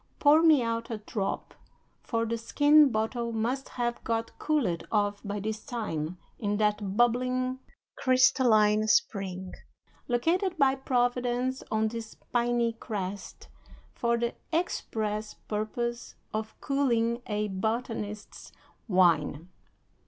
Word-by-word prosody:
Pour 300 +2 +6
me 310 -6 +6
out 230 +1 -2
a 225 - -3
drop, 210 -1 -4 0.5
for 230 -1 -1
the 230 +1 -1
skin 290 +5 +5
bottle 230 +2 -1
must 240 +5 -2
have 240 -1 -3
got 230 0 -1
cooled 235 - 0
off 205 -1 +1
by 205 0 -3
this 215 +2 -4
time 180 -8 -4 0.2
in 205 -2 -1
that 210 -2 0
bubbling, 255 +2 +1 0.4
crystalline 240 -5 +4
spring, 195 - 0 0.5
located 340 +9 +1
by 275 -3 +4
Providence 250 0 0
on 220 0 +1
this 225 -1 -7 0.2
piny 240 -1 +2
crest 200 -4 -6 0.5
for 235 0 +1
the 235 0 -1 0.2
express 215 -10 -2
purpose 235 +3 -4 0.2
of 220 0 -4
cooling 240 -4 +1
a 210 -1 -1
botanist's 215 +1 -4 0.4
wine." 170 -4 +2
230 Hz, 115 wpm, -28 LUFS, 210-250 Hz, 0.5 s, Pour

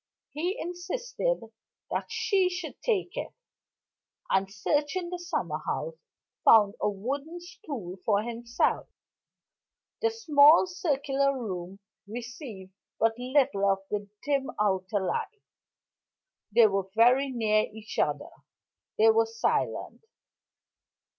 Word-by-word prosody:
He 350 +6 -2
insisted 485 +8 -2 0.5
that - - -2
she 450 -5 +2
should 355 -3 -6
take 400 -6 0
it; - - -4 1.0
and, 190 0 +2
searching 295 - -1
the 360 - -4
summer 350 +1 -2
house, - - -3 0.5
found 210 -3 +7
a - - +2
wooden 275 - -4
stool 265 - -8
for 210 -1 +2
himself. 235 +1 -1 1.1
The 455 - +3
small 315 -8 +6
circular 280 -6 0
room 185 -4 -5 0.3
received 230 - -8 0.3
but 225 0 +3
little 250 -6 +2
of 195 0 +1
the 205 -1 -3 0.2
dim 280 -2 0
outer 195 0 +1
light 430 - -3 1.1
they 230 +2 +7
were 195 -2 0
near 235 -3 +3
each 215 0 -7
other - - 0 0.7
they 445 0 +6
were 450 0 +3
silent. 455 0 -1
270 Hz, 110 wpm, -28 LUFS, 210-355 Hz, 1.1 s, found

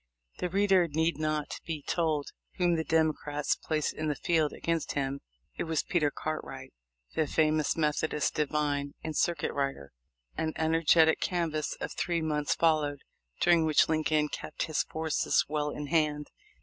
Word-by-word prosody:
The 180 - -1
reader 190 -1 +3
need 160 0 0
not 155 -1 -2
be 155 -3 -5
told 155 -3 0 0.3
whom 175 -1 +2
the 160 -1 0
Democrats 155 -2 +1
placed 155 -2 -2
in 155 - -3
the 150 - 0
field 160 0 +1
against 165 -1 -2
him. 140 -1 -2 0.4
It - - 0
was 160 -2 0
Peter 160 -5 +1
Cartwright, 135 -3 -6 0.4
the 155 - +1
famous 155 -1 +2
Methodist 150 -1 0
divine 145 -2 -1
and 155 -1 -4
circuit 170 +3 0
rider. 135 - -3 0.4
An 160 -1 -1
energetic 160 0 +4
canvass 165 -4 -1
of - - -4
three 170 -2 -1
months 150 -2 0
followed, 155 -3 +1 0.4
during 170 -2 +5
which 155 -2 +4
Lincoln 155 -1 +1
kept 155 - -4
his 155 - 0
forces 160 -1 0
well 150 0 -1
in 150 0 -5
hand. 150 -1 0
155 Hz, 150 wpm, -29 LUFS, 150-160 Hz, 0.4 s, during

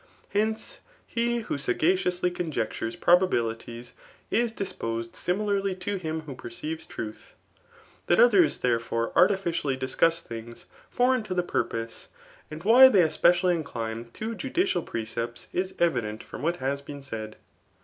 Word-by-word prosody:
Hence, 220 +2 -1 0.3
he 235 0 0
who 215 - -3
Gagacioualy 180 +6 +1
ccmjectures 155 -10 -3
probabilities^ 120 -9 +1 0.4
ia: 240 +2 +3
disposti 115 - -4
(Similarly 195 +1 0
to 190 +2 -3
htm 160 -2 -3
who 145 - -6
perceives 150 +6 -6
truth. 110 -2 -8 0.7
That 175 - +4
ctherai 220 -7 +7 0.3
tberefei^ 115 0 -2
artificially 170 -7 +2
c&cuss 165 +5 +2
things 115 -2 -9 0.2
foreign 250 0 +2
to 190 -4 -5
the 180 - +2
pwpose, 115 -9 -3 0.4
smd 155 +2 -7
why 250 +5 +9
tbey. 190 -8 +5
especitilly 175 +3 +3
incline 115 -7 -4
to 220 +1 -4
judicial 280 - 0
pre 115 -7 -4
cepts^ 115 +1 -5
ia 185 - +1
evident 115 -11 0
[from - - -9
what 170 +4 +1
has 140 -1 -2
been 140 0 -9
said]. 110 -5 -6
165 Hz, 135 wpm, -27 LUFS, 120-195 Hz, 0.7 s, why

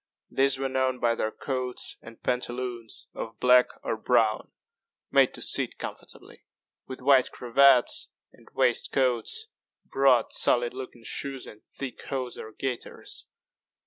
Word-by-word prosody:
These 135 0 +3
were 135 0 -1
known 130 -1 0
by 120 -1 +2
their 110 - -1
coats 130 +1 -3
and 115 0 -14
pantaloons 125 -2 -3
of 115 - -7
black 125 0 +6 0.2
or - - -1
brown, 110 -1 +1 0.6
made - - +5
to - - -4
sit - - +1
comfortably, - - -9 0.4
with 130 -1 -8
white 135 -1 +5
cravats 125 +1 +4 0.2
and - - -21
waistcoats, 130 - +1 0.4
broad 135 -4 +3
solid 120 0 +3
looking 130 -2 -9
shoes, 135 +3 -4
and 105 - -13
thick 135 -2 -8
hose 130 -3 -4
or 110 - -8
gaiters. 125 +1 -5
125 Hz, 130 wpm, -27 LUFS, 120-135 Hz, 0.6 s, black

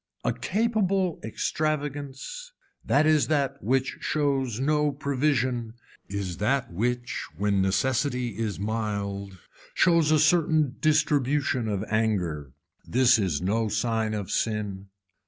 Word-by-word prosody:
A - - +1
capable 195 -5 0
extravagance 145 - -3 0.3
that 145 +2 +3
is 155 -1 +4
that 140 -3 0
which 130 +3 0
shows 135 -6 0
no 150 +2 +2
provision 130 -5 -1 0.3
is 95 -3 -4
that 125 0 0
which 120 +5 -2
when 100 -1 +1
necessity 125 +6 +1
is 110 -4 -2
mild 100 -2 -3 0.4
shows 170 -3 +4
a 155 - +5
certain 155 -3 +3
distribution 145 -5 +1
of 105 -2 -1
anger. 90 - -1 0.3
This 125 -1 +4
is 90 -6 -1
no 110 +4 +1
sign 110 0 0
of 100 -3 -4
sin. 105 -3 -2
125 Hz, 115 wpm, -26 LUFS, 105-150 Hz, 0.4 s, a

